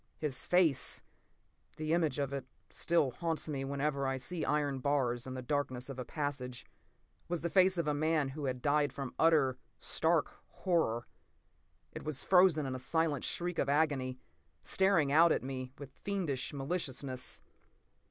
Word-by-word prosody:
His 145 -4 -1
face—the 160 -1 -1
image 160 -5 +1
of 140 -1 -1
it 135 -2 -4 0.2
still 165 -6 +1
haunts 165 +4 -2
me 140 -3 -3
whenever 140 0 -1
I 135 0 0
see 165 +6 -4
iron 145 -2 0
bars 130 -3 0
in 130 - -5
the 130 - -5
darkness 130 -2 -2
of 135 -1 -6
a - - -2
passage—was 145 +4 -6
the 170 - -2
face 185 -1 +4
of 170 -3 0
a 150 - +2
man 155 -1 +1
who 145 +2 -5
has 130 -1 0
died 145 +2 +1
from 135 -2 -5
utter, 155 -6 +4 0.2
stark - - +1 0.2
horror. 160 -11 0 0.9
It - - -8
was 150 -4 -2
frozen 180 -5 +5
in 130 - -3
a 130 - -4
silent 150 +1 0
shriek 175 0 -2
of 140 - +1
agony, 140 -4 +1 0.5
staring 190 -7 +3
out 165 +3 +6
at - - +1
me 130 -1 -5
with 140 -2 -9
fiendish 175 -10 -2
maliciousness. 135 -3 -3
145 Hz, 155 wpm, -33 LUFS, 130-160 Hz, 0.9 s, out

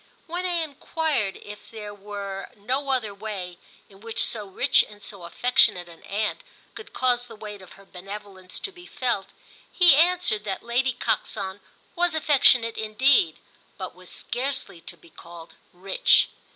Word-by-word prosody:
When 355 +2 -3
I 345 -2 +1
enquired 290 -7 -1
if 210 0 -11
there 210 -2 -7
were 200 -1 -6
no 260 +7 -2
other 240 -6 0
way 195 -4 -6 0.3
in 195 -1 -18
which 230 0 0
so 210 -3 -2
rich 250 +7 +4
and 205 -1 -14
so 195 -4 -5
affectionate 185 -2 +3
an 165 -1 -14
aunt 215 - -2 0.3
could 430 - -10
cause 245 -1 +1
the 230 - -11
weight 210 -2 -8
of 185 - -13
her 195 - -17
benevolence 195 0 -8
to 395 - -4
be 355 -1 -14
felt, 235 -7 -1 0.4
he 355 -3 +7
answered 340 -9 +3
that 195 -3 -4
Lady 245 +3 +1
Coxon 200 -4 -2 0.4
was 350 -1 +1
affectionate 260 -6 +4
indeed, 265 - +3 0.4
but - - -6
was - - -11
scarcely 260 -9 -3
to 175 - -9
be 165 +1 -20
called 170 0 -12 0.2
rich. 190 +2 +3
215 Hz, 155 wpm, -25 LUFS, 195-270 Hz, 0.4 s, he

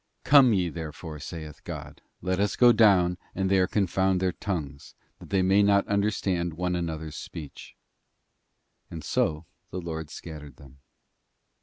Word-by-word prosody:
'Come 140 -3 +7
ye 90 -4 +1
therefore,' 80 -1 -7
saith 75 +1 -8
God, - - -8 0.2
'let 95 +1 0
us 100 0 +1
go 120 -1 +7
down 95 -6 +4 0.2
and 95 0 0
there 95 -1 +4
confound 95 -2 +1
their 95 0 +1
tongue, 80 -8 -4 0.4
that - - -13
they 95 -1 +2
may 95 +2 +4
not 100 -1 +3
understand 100 -5 0
one 90 +1 -1
another's 80 -3 -4
speech. 75 -4 -9 1.1
And 80 -2 -8
so 75 +2 0 0.2
the - - -6
Lord 80 -3 -5
scattered 75 -5 -9
them. 70 0 -17
90 Hz, 145 wpm, -27 LUFS, 80-95 Hz, 1.1 s, Come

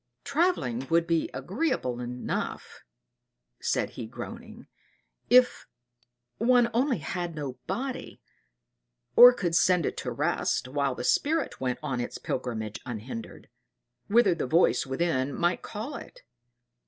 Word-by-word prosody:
"Travelling 280 - 0
would 170 0 +3
be 165 -1 0
agreeable 135 - -2
enough," 125 0 -4 0.8
said - - -1
he 115 - -7
groaning, 230 - -9 0.6
"if 250 0 +4 0.7
one 240 +1 +4
only 255 +3 +2
had 175 +1 -4
no 140 -4 -5
body, 260 0 -4 1.0
or 245 +1 +11
could 180 -8 -2
send 180 -2 +4
it - - -3
to - - -3
rest - - 0
while 140 0 -1
the - - -5
spirit 310 - +1
went 125 -1 -1
on 135 -5 -2
its 120 - -5
pilgrimage 110 -4 -4
unhindered, 115 -1 -7 0.6
whither 215 -3 +4
the 165 -6 -3
voice 165 -1 +3
within 135 -1 0
might 175 +1 +1
call 225 +8 -6
it. - - -12
170 Hz, 125 wpm, -28 LUFS, -, 1.0 s, or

